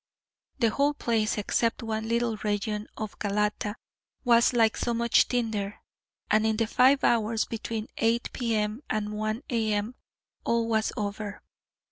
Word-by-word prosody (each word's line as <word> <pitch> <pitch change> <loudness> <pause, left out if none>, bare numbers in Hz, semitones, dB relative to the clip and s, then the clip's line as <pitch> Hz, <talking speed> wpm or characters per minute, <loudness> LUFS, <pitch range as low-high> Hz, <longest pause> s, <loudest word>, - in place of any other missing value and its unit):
The 230 -4 +2
whole 285 +3 +1
place, 225 -5 0
except 230 +3 0
one 220 0 -3
little 235 -1 +1
region 210 +1 -2
of 215 -1 -6
Galata, 210 0 -1 0.5
was 235 -1 +5
like 225 -3 +3
so 235 - -1
much 235 -1 +4
tinder, 220 -5 -2 0.5
and 215 0 +4
in 220 -1 +1
the 230 - +2
five 260 +5 +4
hours 225 -1 +2
between 225 -1 -4
8 230 +1 +1
P.M. 220 -1 -1
and 210 -1 -1
1 215 +3 -2
A.M. 220 -1 0 0.5
all 230 -1 +1
was 220 -1 +1
over. 205 0 -4
220 Hz, 140 wpm, -27 LUFS, 210-235 Hz, 0.5 s, was